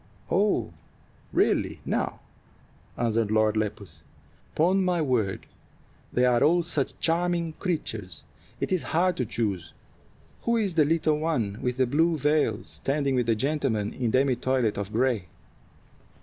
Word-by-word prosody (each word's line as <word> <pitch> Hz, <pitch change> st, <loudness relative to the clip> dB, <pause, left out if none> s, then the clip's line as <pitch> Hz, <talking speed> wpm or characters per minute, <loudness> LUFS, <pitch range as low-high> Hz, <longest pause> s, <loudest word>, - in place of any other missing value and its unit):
"Aw, 205 Hz, -, +2 dB, 0.6 s
really -, -, +1 dB
now!" -, -, -2 dB, 0.8 s
answered 115 Hz, -2 st, +1 dB
Lord 110 Hz, 0 st, +2 dB
Lepus. 105 Hz, -2 st, -4 dB, 0.5 s
"'Pon 185 Hz, +5 st, +3 dB
my 180 Hz, -2 st, +1 dB
word, 120 Hz, -10 st, 0 dB, 0.7 s
they 125 Hz, -, +2 dB
are 125 Hz, -1 st, +3 dB
all 170 Hz, +3 st, +4 dB
such 150 Hz, -5 st, -2 dB
charming 170 Hz, 0 st, 0 dB
creatures, 110 Hz, -, -3 dB, 0.4 s
it -, -, -2 dB
is 185 Hz, -3 st, +2 dB, 0.2 s
hard 180 Hz, +1 st, +3 dB
to 125 Hz, -, -1 dB
choose. 105 Hz, -6 st, -2 dB, 0.7 s
Who 235 Hz, 0 st, +1 dB
is 205 Hz, -5 st, 0 dB
the 155 Hz, -2 st, +4 dB
little 155 Hz, -1 st, +1 dB
one 120 Hz, -11 st, -1 dB
with 125 Hz, -1 st, -1 dB
the 130 Hz, -, +3 dB
blue 160 Hz, +6 st, +2 dB
veil 150 Hz, -7 st, +1 dB
standing 140 Hz, 0 st, -1 dB
with 125 Hz, -2 st, +1 dB
the 115 Hz, -, +3 dB
gentleman 130 Hz, -5 st, -1 dB
in 125 Hz, -3 st, -1 dB
demi 130 Hz, +2 st, +3 dB
toilet 125 Hz, -4 st, 0 dB
of 100 Hz, 0 st, -4 dB
gray?" 120 Hz, -4 st, +1 dB
130 Hz, 140 wpm, -26 LUFS, 110-165 Hz, 0.8 s, all